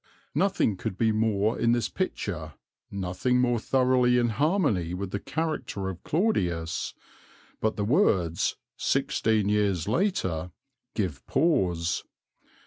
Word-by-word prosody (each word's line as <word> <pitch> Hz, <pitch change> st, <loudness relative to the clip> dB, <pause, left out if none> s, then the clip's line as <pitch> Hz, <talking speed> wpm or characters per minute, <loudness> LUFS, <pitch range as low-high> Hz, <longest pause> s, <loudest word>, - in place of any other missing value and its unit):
'" -, -, -34 dB
Nothing 190 Hz, -, +1 dB
could 90 Hz, -, -4 dB
be 110 Hz, -1 st, +3 dB
more 110 Hz, 0 st, +1 dB
in 115 Hz, 0 st, +3 dB
this 120 Hz, -1 st, +1 dB
picture, 85 Hz, -, -4 dB, 0.3 s
nothing 100 Hz, +6 st, 0 dB
more 120 Hz, -2 st, +2 dB
thoroughly 125 Hz, 0 st, +3 dB
in 120 Hz, -1 st, +2 dB
harmony 115 Hz, -, +1 dB
with 95 Hz, 0 st, -4 dB
the 100 Hz, -, -2 dB
character 155 Hz, -10 st, -3 dB
of 90 Hz, -2 st, -8 dB
Claudius; 90 Hz, -, 0 dB, 0.6 s
but 110 Hz, 0 st, 0 dB
the 105 Hz, -, -1 dB
words 95 Hz, -, +2 dB, 0.2 s
"sixteen 110 Hz, -2 st, +1 dB
years 100 Hz, -5 st, +1 dB
later" 105 Hz, -, 0 dB, 0.5 s
give 90 Hz, -11 st, -2 dB
pause. 90 Hz, -, +1 dB
105 Hz, 125 wpm, -27 LUFS, 90-125 Hz, 0.6 s, be